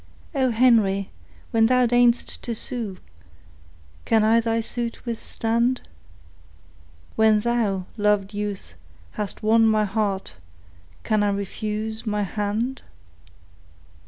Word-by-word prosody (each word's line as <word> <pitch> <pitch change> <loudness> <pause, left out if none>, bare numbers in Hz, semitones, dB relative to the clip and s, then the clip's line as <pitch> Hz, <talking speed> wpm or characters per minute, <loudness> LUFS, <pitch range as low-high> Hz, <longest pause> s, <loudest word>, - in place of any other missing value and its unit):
Henry, 230 -7 +3 0.4
when 225 -1 +4
thou 250 0 +4
deign'st 245 0 +2
to 235 - -4
sue, 220 -4 -5 1.1
Can 220 -1 +3
I 225 +2 +5
thy 230 0 0
suit 235 +1 -3
withstand? 235 +1 -1 1.3
When 220 -1 +4
thou, 210 -5 0
loved 210 -1 +1
youth, 205 -1 -5 0.4
hast 210 -1 -5
won 225 +1 +5
my 215 -1 +3
heart, 200 -2 -2 0.7
Can 215 -1 +1
I 205 - +2
refuse 215 +3 -4
my 210 -1 0
hand? 215 +6 -2
220 Hz, 100 wpm, -23 LUFS, 205-235 Hz, 1.3 s, I